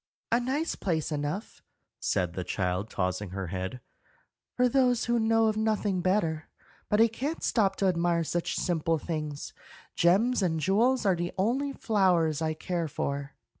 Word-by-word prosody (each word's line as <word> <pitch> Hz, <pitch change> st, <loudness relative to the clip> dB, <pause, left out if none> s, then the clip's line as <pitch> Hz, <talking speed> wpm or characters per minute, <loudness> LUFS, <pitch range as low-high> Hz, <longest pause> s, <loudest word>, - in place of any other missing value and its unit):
"A 235 Hz, -, +4 dB
nice 275 Hz, +7 st, -1 dB
place 160 Hz, -4 st, -2 dB
enough," 150 Hz, +7 st, -4 dB, 0.4 s
said 90 Hz, -2 st, 0 dB
the 90 Hz, -, -3 dB
child, 90 Hz, +2 st, -2 dB
tossing 90 Hz, +1 st, -2 dB
her 95 Hz, +1 st, -4 dB
head, 95 Hz, +7 st, -4 dB, 0.8 s
"for 250 Hz, 0 st, +4 dB
those 250 Hz, -2 st, +2 dB
who 235 Hz, 0 st, +2 dB
know 225 Hz, 0 st, +3 dB
of 215 Hz, -1 st, +2 dB
nothing 215 Hz, -4 st, 0 dB
better; 170 Hz, -4 st, 0 dB, 0.4 s
but 210 Hz, -, +2 dB
I 225 Hz, -, +7 dB
can't 270 Hz, +8 st, -4 dB
stop 195 Hz, -4 st, +2 dB
to 195 Hz, -, 0 dB
admire 170 Hz, -1 st, +1 dB
such 170 Hz, +2 st, -2 dB
simple 165 Hz, -2 st, 0 dB
things. 150 Hz, -2 st, -5 dB, 0.4 s
Gems 210 Hz, +8 st, +3 dB
and 165 Hz, -4 st, +1 dB
jewels 225 Hz, -, +2 dB
are 190 Hz, -2 st, +4 dB
the 175 Hz, 0 st, -3 dB
only 255 Hz, +9 st, +1 dB
flowers 180 Hz, -, +2 dB
I 155 Hz, -1 st, 0 dB
care 170 Hz, 0 st, -2 dB
for." 140 Hz, -1 st, -4 dB
175 Hz, 160 wpm, -28 LUFS, 155-225 Hz, 0.8 s, I